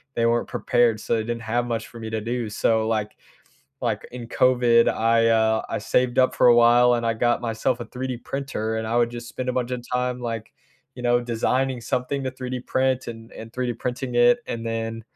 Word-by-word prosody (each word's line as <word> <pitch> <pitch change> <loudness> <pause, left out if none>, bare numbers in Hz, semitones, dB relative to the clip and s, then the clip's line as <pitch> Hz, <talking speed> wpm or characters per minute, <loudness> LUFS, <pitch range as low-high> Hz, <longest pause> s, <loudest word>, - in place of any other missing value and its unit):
they 115 - +1
weren't 120 0 +1
prepared, 120 -3 +1
so - - -1
they 110 - -1
didn't 115 +1 -4
have 120 +2 -1
much 115 -1 -3
for 115 - -12
me 110 -1 -6
to 110 -1 -2
do, 120 0 -3
so, 110 +1 +1
like 110 -2 -2 0.7
like, - - -2
in 120 -2 -7
COVID, 120 -2 +4
I, 115 0 +2
uh, 110 -1 +3
I - - -1
saved 120 +3 0
up 130 0 +4
for - - +5
a 120 - +7
while 120 +1 +6
and 120 -1 -1
I 115 - +1
got 120 +1 +1
myself 120 +1 -1
a 120 - -5
3D 125 -1 -5
printer 120 -5 -3
and 110 0 -3
I 110 - -2
would 120 -1 +3
just 120 0 -7
spend 130 0 -5
a - - +1
bunch 125 -1 -1
of 125 -1 -3
time, 125 0 -1
like, 115 -2 -5 0.4
you 125 - -9
know, 120 0 +3
designing 125 +2 0
something 125 +4 -2
to 130 - -1
3D 130 -1 -5
print 130 0 0
and 115 -1 -9
and 110 0 -10
3D 125 -1 -1
printing 125 0 -4
it, 245 0 +5
and 115 0 -4
then, 115 0 -3
120 Hz, 220 wpm, -24 LUFS, 115-125 Hz, 0.7 s, a